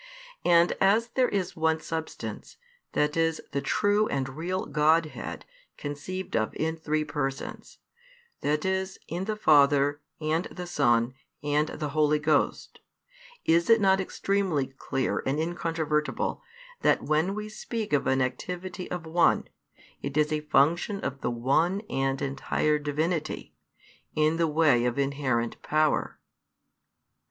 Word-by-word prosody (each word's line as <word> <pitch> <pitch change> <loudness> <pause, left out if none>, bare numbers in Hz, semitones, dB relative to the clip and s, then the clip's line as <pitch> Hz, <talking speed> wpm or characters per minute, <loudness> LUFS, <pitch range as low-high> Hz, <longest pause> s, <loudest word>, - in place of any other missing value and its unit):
And, 170 0 +5
as 220 +5 +4
there 255 0 +2
is 190 -3 -2
one 160 0 +1
Substance, 160 0 -6 0.4
that 150 0 +1
is 165 -1 +1
the 140 - -1
true 205 +9 +2
and 135 -1 -2
real 175 +7 -3
Godhead 155 +2 +1 0.3
conceived 150 +6 -5
of 110 - 0
in 160 +1 -1
three 155 -1 -1
Persons, 145 -3 -4 0.6
that 150 +2 0
is 190 0 -1
in 175 +3 -3
the 215 +1 -2
Father, 145 -5 +4 0.2
and 160 +2 0
the 180 - -7
Son, 120 -7 +2 0.3
and 150 +1 +1
the 150 -1 -4
Holy 150 0 +3
Ghost, 150 -1 0 0.7
is 170 +3 +3
it 230 0 +7
not 190 -1 +4
extremly 190 -6 0
clear 135 0 -2
and 135 +3 -1
incontrovertible 160 -2 -1 0.4
that - - +3
when 160 +6 +1
we 210 0 -4
speak 215 -2 -5
of 145 - +2
an 130 0 +3
activity 180 +8 -5
of 180 -2 -4
one, 170 +2 +2 0.5
it 140 +1 -4
is 150 0 +3
a 155 - 0
function 160 +7 +2
of 135 0 -4
the - - 0
One 140 +11 +1
and 135 0 0
entire 140 +2 0
Divinity, 155 +2 -2 0.6
in 155 +1 +2
the 165 -1 +2
way 150 -6 +3
of 125 +1 0
inherent 135 -4 -1
power? 155 0 +1
155 Hz, 135 wpm, -27 LUFS, 145-175 Hz, 0.7 s, it